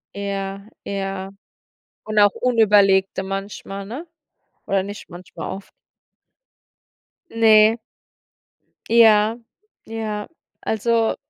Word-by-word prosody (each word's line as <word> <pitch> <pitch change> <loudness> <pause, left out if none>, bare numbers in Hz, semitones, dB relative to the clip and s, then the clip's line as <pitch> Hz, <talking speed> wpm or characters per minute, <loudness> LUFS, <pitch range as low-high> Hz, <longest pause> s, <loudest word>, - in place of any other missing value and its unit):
Ja, 195 0 -5 0.2
ja. 195 -1 -4 0.7
Und 215 -1 0
auch 205 - +7
unüberlegte 205 -5 +3
manchmal, 195 0 -6
ne? 265 - -8 0.6
Oder 195 -1 +1
nicht 205 +1 -9
manchmal, 175 +2 -9
oft. 190 0 -9 1.6
Ne. 220 0 +5 1.1
Ja, 225 -1 +5 0.5
ja. 215 -2 -5 0.3
Also, 225 +1 0
205 Hz, 80 wpm, -21 LUFS, 195-220 Hz, 1.6 s, auch